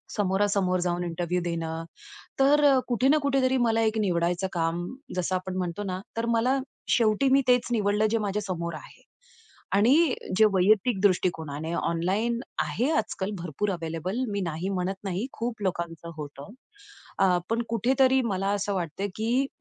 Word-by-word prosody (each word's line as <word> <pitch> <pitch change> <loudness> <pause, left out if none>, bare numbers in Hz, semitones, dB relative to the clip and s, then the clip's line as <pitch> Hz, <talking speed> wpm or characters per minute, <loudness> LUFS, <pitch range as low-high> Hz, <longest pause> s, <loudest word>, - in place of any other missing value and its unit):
समोरासमोर 195 -2 +1
जाऊन 175 0 -1
इंटरव्ह्यूला 175 +1 -2
देणं. 165 -1 -3 0.6
तर 290 +2 +5 0.2
कुठे 250 +2 +2
ना 305 +2 +5
कुठेतरी 270 -2 +2
मला 225 0 +2
एक 220 0 +1
निवडायचं 175 -2 0
काम 170 0 -1 0.3
जसं 180 +1 -1
आपण 185 0 -4
म्हणतो 180 +2 -3
ना, 185 -1 -3 0.2
तर 230 +1 -1
मला 255 +4 +2 0.3
शेवटी 230 +3 +3
मी 275 0 +5
तेच 245 -1 +4
निवडलं 210 -1 +2
जे 230 - +2
माझ्या 210 0 -2
समोर 170 -3 -4
आहे. - - -13 0.7
आणि 260 +9 +4 0.2
जे 220 - +7
वैयक्तिक 195 +3 +3
दृष्टिकोनाने 165 -5 0
ऑनलाईन 190 +9 0 0.2
आहे, 255 +7 -1
आजकाल 200 -2 -2
भरपूर 175 +4 -2
अवेलेबल 170 +4 -3
मी 200 - -1
नाही 170 +1 -3
म्हणत 185 0 -1
नाही. 195 +5 -2
खूप 230 -2 -4
लोकांचं 170 -2 -3
होतं. 145 +1 -8 0.7
अ, - - +4 0.3
पण 230 +1 +1
कुठेतरी 260 +4 +3
मला 195 -3 -1
असं 200 0 -1
वाटतं, 180 +2 -3
की 240 +5 +1
195 Hz, 150 wpm, -27 LUFS, 175-230 Hz, 0.7 s, जे